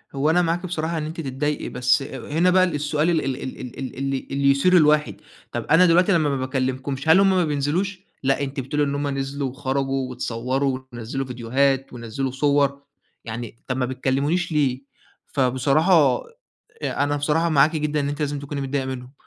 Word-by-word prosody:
هو 140 +3 +1
أنا 175 +2 +4
معاكِ 175 +1 -1
بصراحة 165 -1 -2
إن 155 - -2
أنتِ 160 +2 -5
تتضايقي، 145 +1 -2
بس 125 0 +2
هنا 150 +6 -1
بقى 185 0 +5
ال 180 -4 0
السؤال 150 +2 0
ال 165 -4 +1
ال 135 -1 -1
ال 130 - -6 0.2
ال 130 -2 -5
اللي 135 0 -2
اللي 140 0 +3
يثير 180 +7 +4
الواحد. 150 - +3 0.4
طَب - - -4
أنا 165 +4 +5
دلوقتي 180 +3 +4
لما 160 -5 +3
ما 140 - 0
باكلمكمش، 130 +2 -2
هل 160 - +7
همّ 195 0 +5
ما 185 -2 +3
بينزلوش؟ 160 +7 -1 0.2
لأ، 135 +1 +1
أنتِ 135 0 -4
بتقولي 140 +3 -1
إن 140 0 -1
همّ 145 0 -1
نزلوا 135 0 -2
وخرجوا 135 0 -2
واتصوروا، 130 +2 -2
ونزّلوا 120 +4 -4
فيديوهات 130 +2 0
ونزّلوا 120 +3 -4
صور، 140 0 +1 0.4
يعني 115 0 -6
طَب 125 - -2
ما 130 - +1
بتكلمونيش 140 +7 -1
ليه؟! 140 -4 +1 0.5
فبصراحة 140 +3 +3 0.7
آآ 140 - 0
أنا 145 0 0
بصراحة 150 +3 +1
معاكِ 155 +1 +4
جدًا 150 0 -1
إن 140 - -1
أنتِ 145 +1 -4
لازم 145 -1 -1
تكوني 140 0 -5
متضايقة 135 0 -2
منّهم. 130 0 -6
140 Hz, 185 wpm, -23 LUFS, 130-155 Hz, 0.7 s, هل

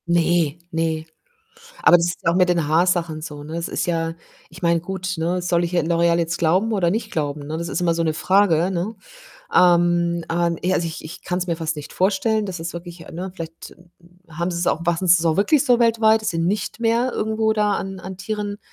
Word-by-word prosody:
Ne, 170 -2 +2
ne. 160 -1 -1 0.8
Aber 175 - +7
das 170 0 +1
ist 175 - -5
auch 165 - +3
mit 180 0 +3
den 170 -4 +1
Haarsachen 165 -1 +1
so, 150 -2 -7
ne? 155 +2 -8
Das 170 0 -3
ist - - -2
ja 165 -1 -1 0.4
ich 165 +2 -13
meine, 170 -1 +2
gut, 185 +1 -4
ne, 170 +3 -1
soll 175 -1 +1
ich, 170 - -4
äh, 175 - +3
L'Oréal 170 +1 +2
jetzt 165 0 -1
glauben 185 +7 +2
oder 185 -5 +2
nicht 215 +2 -2
glauben, 145 -2 -3
ne? 155 +2 -4
Das 170 +1 -4
ist - - -2
immer 170 -2 +2
so 165 - 0
'ne 160 - +1
Frage, 180 0 +2
ne? 190 +4 -2 0.6
Ähm, 175 -1 +3
äh, 170 0 +1 0.2
e 185 - +3
also, 170 - 0
ich 160 -1 -6
ich 155 - -9
kann's 180 0 -2
mir 170 -2 -1
fast 160 0 -2
nicht 150 0 -8
vorstellen, 210 +3 +1
das 185 -3 -5
ist 165 +1 -5
wirklich 170 0 -8
äh, - - -11
ne, 185 +3 -5
vielleicht, 165 -2 -8
hm, 175 0 -22 0.4
hm, 160 -1 -14
haben 170 +1 0
sie's 175 0 -2
auch - - +1
machen 175 +2 0
sie's 170 -1 +5
auch 160 -1 +2
wirklich 255 +9 +3
so 245 -4 +4
weltweit, 225 -2 +4
dass 215 - 0
sie 165 - -3
nicht 195 +7 -1
mehr 235 +2 +1
irgendwo 220 0 0
da 210 -1 +2
an 195 -1 -4
an 185 +1 -8
Tieren, 205 0 -4
175 Hz, 230 wpm, -21 LUFS, 165-190 Hz, 0.8 s, Aber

